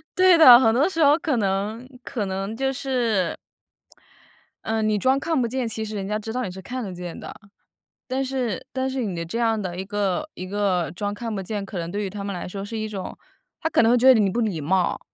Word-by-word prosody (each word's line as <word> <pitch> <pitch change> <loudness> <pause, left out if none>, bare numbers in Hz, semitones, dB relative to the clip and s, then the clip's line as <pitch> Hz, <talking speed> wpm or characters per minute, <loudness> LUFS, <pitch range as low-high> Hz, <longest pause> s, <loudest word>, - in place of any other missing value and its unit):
对 370 0 +6
的， 255 -8 +10
很 225 -4 +4
多 280 +9 +3
时 330 -4 +1
候 285 +1 +6
可 315 -7 0
能 210 +4 -1 0.2
可 215 -5 -3
能 195 +3 -4
就 270 0 0
是 235 -9 0 1.3
呃， 220 0 -1
你 215 -1 +1
装 260 +5 +2
看 320 -1 0
不 - - +1
见， 255 0 -2
其 220 0 -4
实 215 - -7
人 195 -1 -4
家 210 +1 -1
知 215 +1 -6
道 255 - -1
你 195 - -3
是 190 +1 -9
看 255 +7 -5
得 195 -4 -6
见 175 -1 -7
的。 - - -8 0.7
但 260 +1 -1
是 255 -6 -2
但 260 0 -2
是 265 0 -3
你 195 -6 -3
的 170 - -3
这 170 +8 -4
样 225 -2 +1
的 180 -3 -4
一 - - -2
个 205 +7 -1
一 185 - -7
个 190 -4 0
装 205 +3 -3
看 230 +1 -5
不 195 - -3
见， 205 +1 -4
可 195 -1 -6
能 170 0 -4
对 205 +3 -3
于 195 - -4
他 200 +1 -6
们 200 -1 -4
来 175 - -5
说 195 +2 -6
是 225 +3 -6
一 215 - -2
种 200 -3 -6 0.4
他 320 - -1
可 - - +3
能 225 - +4
会 - - +5
觉 260 +2 +7
得 230 - +4
你 200 - +3
不 235 - -1
礼 200 -8 -1
貌。 180 +4 0
215 Hz, 270 characters per minute, -23 LUFS, 195-255 Hz, 1.3 s, 的